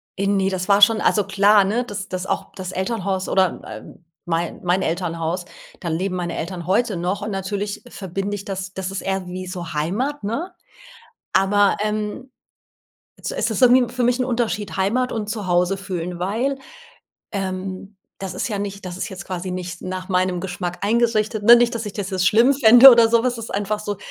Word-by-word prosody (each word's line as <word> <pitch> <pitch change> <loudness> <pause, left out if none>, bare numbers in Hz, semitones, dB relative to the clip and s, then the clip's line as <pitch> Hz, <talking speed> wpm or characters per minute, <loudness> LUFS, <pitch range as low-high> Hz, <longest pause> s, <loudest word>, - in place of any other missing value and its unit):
äh, 195 +1 -1
ne, 195 -1 +2
das 185 0 -3
war 200 0 +5
schon 220 +1 +6
also, 205 - +2
klar, 200 +1 +4
ne? 220 +6 0
Das 205 -3 -6
das 185 0 -4
auch - - -3
das 185 -1 -6
Elternhaus 190 -1 -2
oder 190 -2 +1
äh, - - -8
äh, - - -14 0.3
mei 170 0 -2
mein 180 +2 +1
Elternhaus, 170 0 -2 0.3
da 175 - -6
leben 185 +3 -2
meine 175 -1 -3
Eltern 175 +1 -5
heute 210 0 +1
noch 185 +4 -2
und 210 +1 -4
natürlich 200 +2 -4
verbinde 195 +1 -4
ich 200 - -7
das 190 -1 -5
das 190 0 -4
ist 195 - -4
eher 190 -1 -2
wie 185 +1 -6
so 175 -4 -6
Heimat, 210 - -2
ne? 280 - -3 0.8
Aber, 200 +1 +3
ähm 215 +4 -3 0.9
also, - - -5
es - - 0
ist - - -2
irgendwie 245 -1 +5
für 250 - -1
mich 245 +1 +2
'n 255 - +1
Unterschied 230 -5 -2
Heimat 230 +7 0
und 215 -2 -3
zu 210 -3 -4
Hause 180 +2 +2
fühlen, 180 -2 -5
weil, 230 +10 -1 0.7
ähm, 190 0 -5 0.2
das 190 -2 -6
ist - - -2
ja 210 -4 -3
nicht 200 0 -5
das 180 -1 -6
ist - - -4
jetzt 185 -2 -8
quasi 185 0 -4
nicht 180 -1 -6
nach 185 0 -5
meinem 185 -1 +1
Geschmack 180 -1 -5
eingerichtet, 220 -1 +1
ne? 235 +2 +9
Nicht, 235 0 +2
dass 230 -1 -3
ich 205 - -6
das 200 -2 -4
jetzt 185 -1 0
schlimm 235 +6 +5
fände 245 +1 +9
oder 235 -2 +6
so 235 0 +3
was, 250 -1 0
das 230 -1 -6
ist - - -11
einfach 205 +1 -1
so 205 -1 -4
195 Hz, 205 wpm, -21 LUFS, 185-220 Hz, 0.9 s, ne